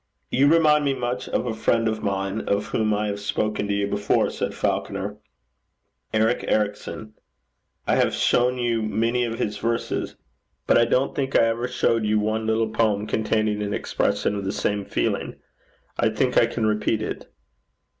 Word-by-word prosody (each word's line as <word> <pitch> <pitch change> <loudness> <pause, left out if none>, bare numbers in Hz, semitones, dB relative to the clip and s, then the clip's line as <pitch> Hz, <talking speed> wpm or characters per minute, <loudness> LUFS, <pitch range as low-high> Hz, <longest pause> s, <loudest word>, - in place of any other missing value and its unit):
'You 135 +3 +4
remind 150 -1 +5
me 140 -1 +1
much 125 0 -3
of - - -1
a 120 - -2
friend 115 +1 +1
of 110 0 -2
mine 100 +1 -2
of 100 0 +1
whom 110 -1 0
I 105 0 0
have 100 -1 -3
spoken 105 0 -1
to 100 - 0
you 100 0 +1
before,' 100 +1 +1
said - - -3
Falconer, - - -2 0.9
'Eric 110 +2 +1
Ericson. 105 +1 -2 0.7
I - - +2
have - - +3
shown 125 +1 +2
you 120 -2 0
many 115 +3 0
of 115 -1 -4
his 105 0 -2
verses, 115 +1 -2 0.5
but - - +3
I 120 - +5
don't 130 +3 +1
think 135 -1 -2
I - - +6
ever 115 +2 0
showed 115 -2 +1
you 105 0 +2
one 110 +1 -1
little 110 0 +1
poem 105 -2 +1
containing 110 -1 0
an 105 0 -2
expression - - 0
of 100 -1 -3
the 95 - -1
same 100 -1 -1
feeling. - - -2 0.6
I - - +3
think - - 0
I - - +5
can 115 - -2
repeat 110 0 0
it. - - -6
110 Hz, 175 wpm, -24 LUFS, 105-120 Hz, 0.9 s, I